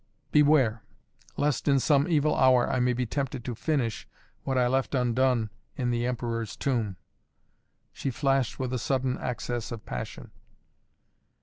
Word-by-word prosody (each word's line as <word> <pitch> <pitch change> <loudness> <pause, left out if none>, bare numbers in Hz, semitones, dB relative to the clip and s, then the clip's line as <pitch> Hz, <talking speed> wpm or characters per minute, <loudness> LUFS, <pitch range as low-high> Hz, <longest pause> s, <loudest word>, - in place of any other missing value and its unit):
"Beware 145 -7 +4 0.6
lest 145 -4 0
in 140 -1 +4
some 140 +2 +3
evil 155 -3 +2
hour 130 -2 +5
I 130 - 0
may 125 0 +3
be 125 +1 -1
tempted 135 -1 -3
to 125 - -3
finish 120 -3 -1 0.3
what 135 -1 -1
I 125 - +4
left 130 +2 0
undone 125 -2 +1 0.2
in 125 -4 -1
the 120 0 0
Emperor's 115 -3 -3
Tomb!" 115 -8 -1 1.0
she 135 - -3
flashed 135 -1 0
with 130 -1 -3
a 125 - 0
sudden 130 0 -1
access 120 -2 -3
of 115 -2 -7
passion. - - -6
125 Hz, 145 wpm, -28 LUFS, 120-135 Hz, 1.0 s, hour